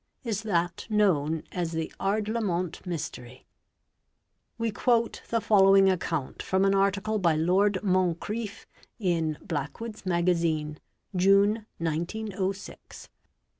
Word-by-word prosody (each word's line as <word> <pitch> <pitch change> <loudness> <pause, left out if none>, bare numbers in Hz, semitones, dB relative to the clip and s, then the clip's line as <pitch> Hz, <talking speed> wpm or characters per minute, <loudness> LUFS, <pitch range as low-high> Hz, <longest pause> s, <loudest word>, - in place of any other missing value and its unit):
is 220 -4 -2
that 175 -5 -1
known 165 -8 +2
as 170 -2 -3
the 160 0 -3
Ardlamont 205 -4 -1
Mystery. 130 -7 -6 1.1
We 230 -1 -1
quote 230 +2 +1
the 230 - +1
following 195 -2 +5
account 165 -6 -3
from 190 +1 +1
an 195 - +3
article 200 +2 +1
by 170 -4 +3
Lord 185 +5 +2
Moncretff 190 +3 -1 0.3
in 165 -7 0
" - - -28
Black 145 -3 -3
wood's 225 -2 -7
Magazine, 170 -4 0 0.4
June, 200 +4 +3
1906, 190 +4 -4
p. - - -26
190 Hz, 115 wpm, -27 LUFS, 165-210 Hz, 1.1 s, following